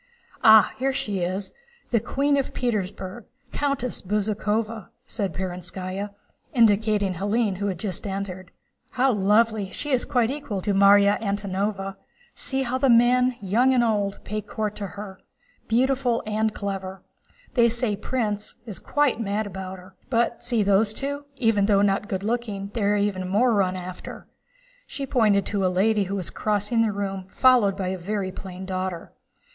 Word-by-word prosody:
"Ah, 220 -2 +7
here 270 +1 +1
she 210 -7 -2
is, 185 +3 -2 0.4
the 235 - +4
Queen 280 +5 +1
of 275 -2 -2
Petersburg, 205 -3 -3 0.3
Countess 275 -4 -2
Bezúkhova," 210 +1 -1 0.2
said 200 -7 -3
Perónskaya, 185 +3 -5 0.5
indicating 210 -3 +3
Hélène 205 +2 0
who 205 +1 -2
had 190 -3 -2
just 190 +1 -3
entered. 190 -2 -5 0.4
"How 260 +1 +3
lovely! 210 0 +2
She 290 +9 -5
is 255 -2 +2
quite 245 -3 +1
equal 280 -9 -4
to 205 - 0
Márya 200 +1 +5
Antónovna. 200 -1 -2 0.4
See 270 0 -2
how 255 +1 -2
the 270 0 +3
men, 250 +1 +4
young 240 +7 +3
and 245 - +4
old, 205 -3 0
pay 215 +1 -3
court 215 0 -4
to 200 - -4
her. 195 -2 -8 0.5
Beautiful 250 +1 +1
and 215 +1 0
clever... 195 -2 -5 0.5
they 235 -2 +5
say 235 -2 0
Prince 210 -2 -3
—— - - -37
is 210 -7 -4
quite 290 -5 +1
mad 210 0 -1
about 190 -1 -6
her. 185 +1 -15 0.2
But 235 -1 0
see, 240 -3 +2
those 205 +2 +2
two, 285 +1 -3
though 205 -4 +3
not 200 +1 +1
good 190 -3 -2
looking, 210 -3 -3
are 205 -2 +2
even 195 -3 -1
more 230 +5 +3
run 190 -3 +1
after." 185 0 -8 0.6
She 275 - -5
pointed 215 -6 +3
to 200 -2 -1
a - - +3
lady 200 +3 +2
who 195 +2 -3
was 185 -4 -3
crossing 210 +2 0
the 225 -2 +2
room 195 -2 -4
followed 240 -7 +4
by 190 -2 -2
a 190 0 -3
very 195 +1 -3
plain 185 0 -8
daughter. 185 -2 -4
205 Hz, 160 wpm, -24 LUFS, 195-235 Hz, 0.6 s, Ah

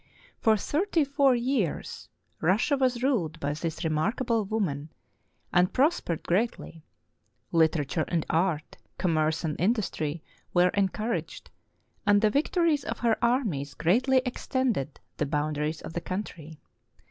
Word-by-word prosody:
For 220 -2 +4
thirty 325 - +1
four 280 -2 +3
years 240 - -2 0.3
Russia 200 - +2
was 255 -2 0
ruled 175 - 0
by 145 -1 -1
this 160 +3 -4
remarkable 220 +8 0
woman, 160 -8 -2 0.6
and 180 +1 +4
prospered 265 - +1
greatly. 180 -4 -1 0.7
Literature 160 -1 +2
and 165 -3 -1
art, 165 -2 0 0.2
commerce 160 -2 +1
and 155 -1 -3
industry 175 -7 -1 0.3
were 180 +1 +5
encouraged, 210 +4 -2 0.5
and 205 -1 +5
the 215 0 +3
victories 305 - +2
of - - -4
her 230 -2 +2
armies 195 - 0
greatly 250 - +3
extended 245 - -1 0.2
the 150 - 0
boundaries 150 +1 -1
of - - -8
the 170 - -3
country. 165 -5 -6
185 Hz, 125 wpm, -27 LUFS, 160-245 Hz, 0.7 s, were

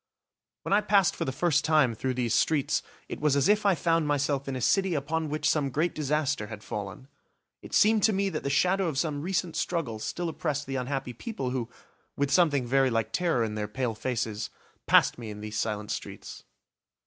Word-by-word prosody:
When - - -1
I 205 - +5
passed 200 -3 +3
for - - -3
the 130 - -1
first 165 +3 +1
time 155 -6 +3
through 130 +3 -2
these 120 -3 0
streets, 150 -4 +2 0.3
it - - -6
was 150 -2 +2
as 140 -1 +3
if 210 0 +3
I 195 - +4
found 165 -1 +1
myself 145 -1 0
in 135 - -3
a - - -3
city 190 - +2
upon 155 +2 -2
which 150 +1 -1
some 145 -3 +2
great 155 +6 0
disaster 145 -5 -1
had 105 -1 -9
fallen. 100 +5 -6 0.5
It - - -6
seemed 215 0 +5
to 220 - +4
me 195 0 0
that - - -4
the 140 - -2
shadow 185 +6 +2
of 155 -5 -3
some 145 0 -1
recent 180 0 -2
struggle 140 -11 -2
still 175 +10 -3
oppressed 150 -3 -2
the 135 - -4
unhappy 130 -1 -3
people 135 - -4
who, 125 -3 -3 0.5
with 140 0 0
something 145 -6 +3
very 135 +2 +3
like 115 -2 -1
terror 170 -10 +1
in 110 -1 -2
their 105 -1 -3
pale 120 +2 -2
faces, 115 -2 -3 0.4
passed - - +4
me 115 -2 -6
in 105 0 -7
these 105 0 -4
silent 105 -1 -2
streets. - - -7
140 Hz, 205 wpm, -28 LUFS, 120-165 Hz, 0.5 s, I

